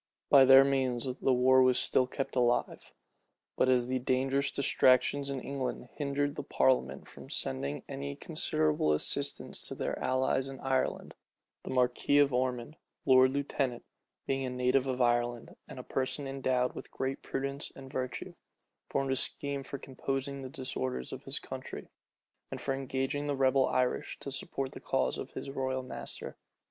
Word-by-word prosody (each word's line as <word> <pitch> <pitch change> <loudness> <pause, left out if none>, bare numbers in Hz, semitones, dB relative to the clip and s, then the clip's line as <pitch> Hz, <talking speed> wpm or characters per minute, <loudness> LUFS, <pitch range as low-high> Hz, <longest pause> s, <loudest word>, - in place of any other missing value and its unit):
By 135 -2 +9
their 135 +1 +9
means 130 -3 0 0.2
the 135 - +3
war 130 +1 +5
was 130 -1 +4
still 130 - +3
kept 135 +1 -4
alive; 120 -1 0 0.6
but 130 - +3
as 125 -1 +3
the 130 0 0
dangerous 135 +2 +1
distractions 140 +1 +3
in 135 -1 -2
England 135 -1 -4
hindered 145 0 -1
the - - -2
parliament 70 - +1
from - - -12
sending 70 +2 -1
any 70 0 -5
considerable 75 0 +1
assistance 75 - -1
to - - -4
their - - -3
allies 130 +1 +1
in 135 - -8
Ireland, 130 -1 -1 0.5
the - - -9
marquis 125 +2 +2
of 140 -2 +5
Ormond, 125 +3 -1 0.3
lord 130 -1 +6
lieutenant, 135 -2 -2 0.4
being 135 0 -1
a 130 - -2
native 125 +1 +1
of 130 -1 +1
Ireland, 120 0 0
and - - -10
a - - -6
person 135 +2 -2
endowed 130 -2 0
with - - -8
great 135 +1 -3
prudence 140 +1 -3
and 135 -1 -11
virtue, 130 -2 -4 0.6
formed 135 -1 0
a - - +2
scheme 140 +1 -2
for 135 +1 -6
composing 135 +1 -4
the 130 - -6
disorders 65 - -4
of - - -8
his - - -2
country, - - -7 0.6
and - - -6
for 135 - -1
engaging 135 +2 -2
the 145 - 0
rebel 135 0 +4
Irish 125 -1 0
to 140 - -5
support 135 0 -3
the - - -9
cause - - 0
of - - -7
his 135 - -6
royal 130 -1 -2
master. 130 - -6
130 Hz, 165 wpm, -31 LUFS, 125-135 Hz, 0.6 s, By